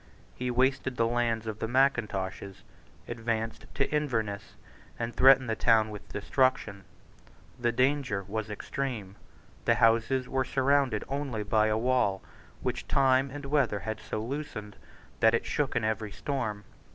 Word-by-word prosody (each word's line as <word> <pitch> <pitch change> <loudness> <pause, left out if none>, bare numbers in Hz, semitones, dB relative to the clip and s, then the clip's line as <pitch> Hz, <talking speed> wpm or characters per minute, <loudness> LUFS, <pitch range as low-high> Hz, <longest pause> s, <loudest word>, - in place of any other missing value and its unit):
He 125 0 -3
wasted 130 +1 +1
the 115 - +3
lands 115 -1 0
of 110 -1 -5
the 115 - -2
Mackintoshes, 105 -7 0 0.4
advanced 115 -1 -3
to 135 - +1
Inverness, 110 -9 -2 0.4
and 115 0 -3
threatened 135 0 +6
the 110 - 0
town 110 -2 +3
with 105 - -10
destruction. 105 -3 0 0.7
The 120 -1 +1
danger 130 -4 +1
was 110 +1 -3
extreme. 105 -2 -4 0.5
The - - +4
houses 115 +3 +3
were 130 0 0
surrounded 135 -4 +1
only 135 -5 -3
by 110 +1 +2
a 110 0 +1
wall 120 -5 +1 0.4
which - - -3
time 135 0 +3
and 145 +1 -7
weather 135 -8 +1
had 110 0 -4
so 110 - -4
loosened 115 -6 -5 0.4
that 110 +1 +5
it - - -2
shook 145 -3 -1
in 120 - +1
every 110 -1 -1
storm. 110 -8 -3
115 Hz, 145 wpm, -29 LUFS, 110-130 Hz, 0.7 s, threatened